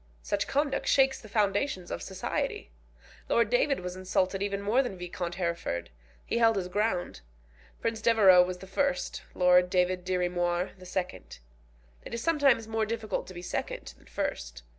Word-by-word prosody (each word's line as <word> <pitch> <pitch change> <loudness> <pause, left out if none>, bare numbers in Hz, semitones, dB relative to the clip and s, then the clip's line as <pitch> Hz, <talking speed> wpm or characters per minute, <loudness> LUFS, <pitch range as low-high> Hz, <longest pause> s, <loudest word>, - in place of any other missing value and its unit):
Such - - -1
conduct 285 0 0
shakes 270 -1 +3
the 215 - -12
foundations 200 -1 0
of - - -4
society. 415 - -3 0.6
Lord - - +3
David 305 - +2
was 180 0 -5
insulted 185 +1 0
even 200 0 -1
more 210 +6 +2
than 245 -8 -4
Viscount 175 -1 -5
Hereford. 170 - -3 0.3
He 235 - -1
held 225 -1 +5
his 190 -2 -2
ground. 200 - -1 0.6
Prince 225 -1 -2
Devereux 205 -6 +7
was 180 0 -1
the 190 - -11
first, 275 +8 -1
Lord 180 0 +5
David 180 0 +1
Dirry 180 -1 0
Moir 175 0 -1
the 185 -2 -13
second. 180 0 -4 0.7
It - - -6
is 235 - -4
sometimes 280 -9 +3
more 225 -1 -1
difficult 220 -1 -3
to 185 - -10
be 175 - -7
second - - -4
than - - -22
first. - - -4
190 Hz, 165 wpm, -29 LUFS, 180-230 Hz, 0.7 s, Devereux